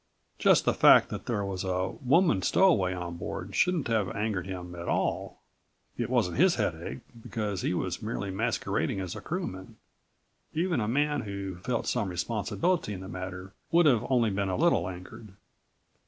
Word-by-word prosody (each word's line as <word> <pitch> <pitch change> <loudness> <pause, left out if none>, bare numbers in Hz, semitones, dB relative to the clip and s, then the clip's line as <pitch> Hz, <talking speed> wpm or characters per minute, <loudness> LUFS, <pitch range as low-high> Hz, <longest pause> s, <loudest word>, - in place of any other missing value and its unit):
Just - - +4
the - - +3
fact - - +6
that - - -6
there 105 -4 -1
was 95 -2 -3
a 95 0 -1
woman 135 - +3
stowaway 100 - +3
on 90 -2 -5
Board - - -6
shouldn't 180 -5 +2
have 110 -5 +1
angered 105 -3 -2
him 90 -2 -6
at 85 0 -7
all. - - -1 0.5
It - - -2
wasn't 90 - +1
his 180 +4 +5
headache, 90 +1 -3 0.2
because 105 -4 -3
he - - 0
was 90 0 -2
merely 105 -3 -3
masquerading 105 -1 -1
as 90 -2 -4
a - - -7
crewman. 155 - -5 0.8
Even 170 -1 +1
a 105 - -1
man 145 +5 +1
who 100 -3 -5
felt 115 +6 -2
some 110 -6 0
responsibility 110 - -1
in 95 - -7
the 95 - -8
matter 95 +1 -7 0.2
would 170 0 +5
have 125 -7 +4
only 120 -5 +3
been 100 0 -1
a 95 - -1
little 115 - +2
angered." 95 +3 -10
100 Hz, 170 wpm, -29 LUFS, 95-125 Hz, 0.8 s, fact